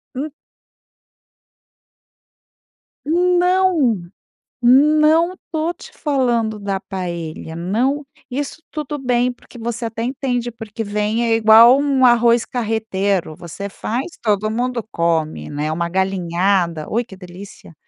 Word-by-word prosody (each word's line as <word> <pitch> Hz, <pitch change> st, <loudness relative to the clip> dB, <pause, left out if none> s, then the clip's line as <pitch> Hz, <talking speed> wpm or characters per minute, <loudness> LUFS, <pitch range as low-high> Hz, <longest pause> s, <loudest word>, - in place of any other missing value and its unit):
Hum. 290 Hz, +3 st, -4 dB, 2.7 s
Não, 355 Hz, -, +2 dB, 0.6 s
não 305 Hz, +7 st, +4 dB, 0.2 s
tô 320 Hz, +1 st, -1 dB
te 350 Hz, -, -14 dB
falando 240 Hz, -7 st, 0 dB
da 200 Hz, -1 st, -2 dB
paella, 170 Hz, -4 st, -6 dB
não. 250 Hz, -, -1 dB, 0.2 s
Isso 285 Hz, +4 st, -4 dB
tudo 295 Hz, -1 st, -4 dB
bem, 250 Hz, -1 st, +1 dB
porque 245 Hz, 0 st, -16 dB
você 235 Hz, 0 st, -3 dB
até 225 Hz, 0 st, -5 dB
entende, 245 Hz, -1 st, -2 dB
porque 225 Hz, -1 st, -7 dB
vem 210 Hz, +3 st, -1 dB
é 225 Hz, -1 st, +2 dB
igual 225 Hz, +4 st, +7 dB
um 275 Hz, -2 st, +2 dB
arroz 240 Hz, -1 st, +5 dB
carreteiro. 205 Hz, -7 st, -1 dB
Você 200 Hz, +4 st, -7 dB
faz, 235 Hz, +6 st, -3 dB, 0.2 s
todo 215 Hz, -1 st, +1 dB
mundo 240 Hz, 0 st, -2 dB
come, 165 Hz, -2 st, -1 dB
né, 150 Hz, +1 st, -3 dB
uma 170 Hz, +2 st, -1 dB
galinhada, 180 Hz, -2 st, 0 dB
ui, 235 Hz, +3 st, +1 dB
que 200 Hz, -5 st, -13 dB
delícia. 180 Hz, -2 st, -12 dB
230 Hz, 115 wpm, -19 LUFS, 195-265 Hz, 2.7 s, igual